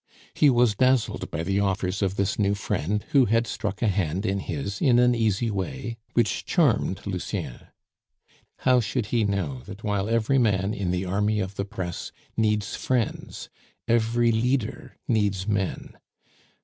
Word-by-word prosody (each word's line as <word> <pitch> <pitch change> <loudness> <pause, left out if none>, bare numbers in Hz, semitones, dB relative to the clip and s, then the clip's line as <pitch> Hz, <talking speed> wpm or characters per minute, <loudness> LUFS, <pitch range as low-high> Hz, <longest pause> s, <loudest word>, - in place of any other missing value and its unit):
He 150 - +5
was 120 -3 +4
dazzled 130 +2 +1
by 80 - -3
the 100 +3 0
offers 95 -1 0
of 95 -1 0
this 100 +1 -1
new 100 0 +2
friend, 100 +1 -2
who 135 -3 +5
had 115 +2 +2
struck 105 -1 -4
a - - +3
hand 95 -1 0
in 100 0 0
his 100 -2 -4
in 125 -3 +4
an 125 0 +5
easy 115 -1 +1
way, 95 - -4 0.2
which 120 - +1
charmed 130 - +1
Lucien. 90 -10 -4 0.9
How 130 -1 +4
should 120 +1 -1
he 115 -3 +3
know 90 -11 -2
that 100 +3 -9
while 105 -1 -1
every 115 +4 +2
man 100 -3 +1
in 95 -5 -2
the 90 +1 -1
army 105 +3 0
of 95 -1 -3
the 100 - -3
press 90 -3 -5 0.2
needs 105 -2 0
friends, 125 -3 -2 0.4
every 115 0 +2
leader 125 +2 -1
needs 100 -5 +1
men. 100 -3 -2
105 Hz, 160 wpm, -25 LUFS, 95-115 Hz, 0.9 s, He